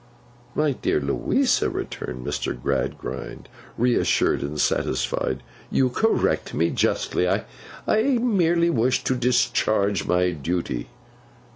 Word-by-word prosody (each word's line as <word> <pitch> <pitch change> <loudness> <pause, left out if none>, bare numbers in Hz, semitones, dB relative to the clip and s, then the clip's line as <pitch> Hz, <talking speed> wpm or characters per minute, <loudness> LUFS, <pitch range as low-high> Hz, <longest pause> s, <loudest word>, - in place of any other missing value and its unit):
'My 150 -1 +2
dear 125 - 0
Louisa,' 70 -1 +1
returned 60 0 -5
Mr. - - -3
Gradgrind, - - -3 0.3
reassured 120 0 +2
and 75 +2 -4
satisfied. 65 -1 0 0.3
'You 130 -1 +2
correct 225 - +1
me - - +2
justly. - - +1
I - - 0 0.7
merely 175 -8 +2
wished 125 -1 +1
to 130 - +1
discharge 120 -5 +1
my 90 0 +2
duty. 80 -5 -3
110 Hz, 105 wpm, -24 LUFS, -, 0.7 s, My